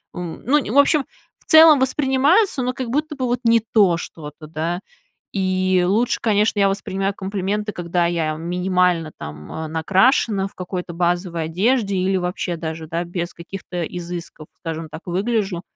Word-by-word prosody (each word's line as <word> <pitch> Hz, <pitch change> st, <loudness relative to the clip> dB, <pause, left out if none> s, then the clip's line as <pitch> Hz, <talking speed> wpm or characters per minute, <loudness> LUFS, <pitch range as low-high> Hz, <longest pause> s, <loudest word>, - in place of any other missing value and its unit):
м. 175 Hz, -2 st, -6 dB
Ну, 270 Hz, -4 st, +1 dB
в -, -, +1 dB
общем, 285 Hz, 0 st, +4 dB, 0.3 s
в -, -, -27 dB
целом, 315 Hz, -1 st, +8 dB
воспринимается, 270 Hz, -, +2 dB
но 250 Hz, -, 0 dB
как 255 Hz, -2 st, -5 dB
будто 300 Hz, +4 st, -1 dB
бы 260 Hz, -, -1 dB
вот 245 Hz, 0 st, -1 dB
не 230 Hz, 0 st, +5 dB
то 195 Hz, -6 st, +5 dB
что-то, 155 Hz, -2 st, -9 dB
да, 165 Hz, +3 st, -3 dB, 0.5 s
и 185 Hz, -1 st, +1 dB
лучше, 225 Hz, +6 st, +1 dB
конечно, 210 Hz, -1 st, +2 dB
я 200 Hz, -, +5 dB
воспринимаю 195 Hz, 0 st, -2 dB
комплименты, 200 Hz, +2 st, -3 dB
когда 175 Hz, -1 st, 0 dB
я 165 Hz, -3 st, -1 dB
минимально 180 Hz, 0 st, 0 dB
там, 75 Hz, 0 st, -9 dB
м, 160 Hz, -1 st, -5 dB
накрашена, 195 Hz, -, +2 dB
в -, -, -18 dB
какой-то 180 Hz, -1 st, -5 dB
базовой 175 Hz, 0 st, -1 dB
одежде 200 Hz, +5 st, +1 dB
или 190 Hz, +1 st, +1 dB
вообще 180 Hz, 0 st, -2 dB
даже, 160 Hz, -1 st, -5 dB
да, 170 Hz, +2 st, -2 dB
без 175 Hz, 0 st, -4 dB
каких-то 180 Hz, 0 st, -6 dB
изысков, 170 Hz, -2 st, -7 dB
скажем 165 Hz, -1 st, -5 dB
так, 160 Hz, -, -9 dB
выгляжу. 195 Hz, 0 st, -1 dB
185 Hz, 160 wpm, -21 LUFS, 170-220 Hz, 0.5 s, целом